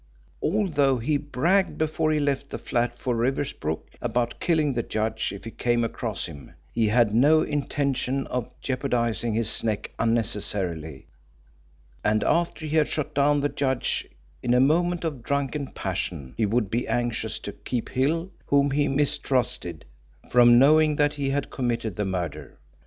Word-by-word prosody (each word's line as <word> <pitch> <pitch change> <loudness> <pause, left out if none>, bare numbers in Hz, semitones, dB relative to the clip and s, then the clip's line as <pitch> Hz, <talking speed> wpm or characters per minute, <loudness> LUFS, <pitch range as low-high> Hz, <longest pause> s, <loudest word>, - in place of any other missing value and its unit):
Although 155 -8 +2
he 145 +6 +1
bragged 165 +7 +1
before 155 0 0
he 155 - +2
left 140 -1 -1
the - - -4
flat 120 0 -1
for 125 -1 -1
Riversbrook 120 - -2
about 120 -1 -1
killing 155 -5 +2
the 120 - 0
judge 110 -1 -2
if 100 - -8
he 115 - -7
came 120 0 +1
across 115 - -3
him, 70 -2 -11 0.2
he 115 -2 +2
had 110 -1 +3
no 145 +7 +5
intention 140 -2 -1
of 125 -2 -3
jeopardising 120 -4 -1
his 115 0 +1
neck 110 -2 -2
unnecessarily, 95 - -1 1.0
and 105 0 +2
after 170 -1 0
he 155 +1 -2
had 155 - +4
shot 150 - -3
down 145 +1 +3
the 145 - +2
judge 130 -3 -1 0.3
in 120 0 +2
a - - +5
moment 170 +6 +2
of 150 -7 -3
drunken 140 +2 -1
passion 85 - -4
he 110 - +1
would 110 -1 0
be 120 +2 -1
anxious 120 -2 -1
to 100 - -6
keep 120 +3 -4
Hill 165 +8 0 0.2
whom 140 0 +3
he 145 +1 +2
mistrusted 130 - 0 0.5
from 120 -1 +7
knowing 155 +3 +5
that 145 0 +2
he 140 -2 -2
had 140 0 -2
committed 115 -5 -2
the 105 - -1
murder. 85 -6 -4
125 Hz, 155 wpm, -25 LUFS, 115-145 Hz, 1.0 s, from